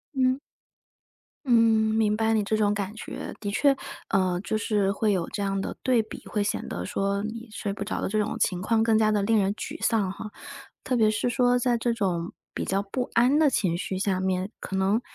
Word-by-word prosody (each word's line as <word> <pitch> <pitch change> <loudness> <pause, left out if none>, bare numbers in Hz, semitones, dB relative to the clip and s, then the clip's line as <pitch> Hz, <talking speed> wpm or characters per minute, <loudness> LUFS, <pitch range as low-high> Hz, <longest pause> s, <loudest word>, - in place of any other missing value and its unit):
嗯。 260 +1 +2 1.1
嗯， 250 - -1 0.4
明 215 -1 +2
白 225 0 +2
你 215 -2 +2
这 215 +1 0
种 205 -1 +2
感 200 0 -3
觉。 - - -7
的 205 - -3
确， 280 +5 +3 0.3
呃， 185 -3 +1
就 215 - -1
是 205 -2 +1
会 210 +1 +1
有 180 -3 -1
这 205 - -4
样 195 -1 0
的 - - -4
对 250 -3 +3
比， 215 - -10
会 210 -1 0
显 205 - -2
得 - - -4
说 200 +1 -1
你 230 +2 -6
睡 205 -2 -3
不 200 - -4
着 210 - -3
的 - - -1
这 215 - 0
种 210 - -2
情 180 -2 +1
况 225 +3 +2
更 225 -1 +3
加 215 -1 +3
地 210 -1 +2
令 220 +1 +3
人 200 0 +1
沮 - - -6
丧 210 -5 +2
哈。 210 +2 -8 0.5
特 255 - 0
别 220 -2 +4
是 220 +3 0
说 245 0 +3
在 245 -1 +1
这 235 0 0
种 180 -6 -1 0.2
比 - - -3
较 195 +1 0
不 245 +5 -3
安 250 +6 +4
的 310 -2 +5
情 180 -9 0
绪 190 +1 -3
下 190 -1 0
面， 190 +2 -1
可 190 - -5
能 195 +5 +2
210 Hz, 240 characters per minute, -26 LUFS, 195-230 Hz, 1.1 s, 的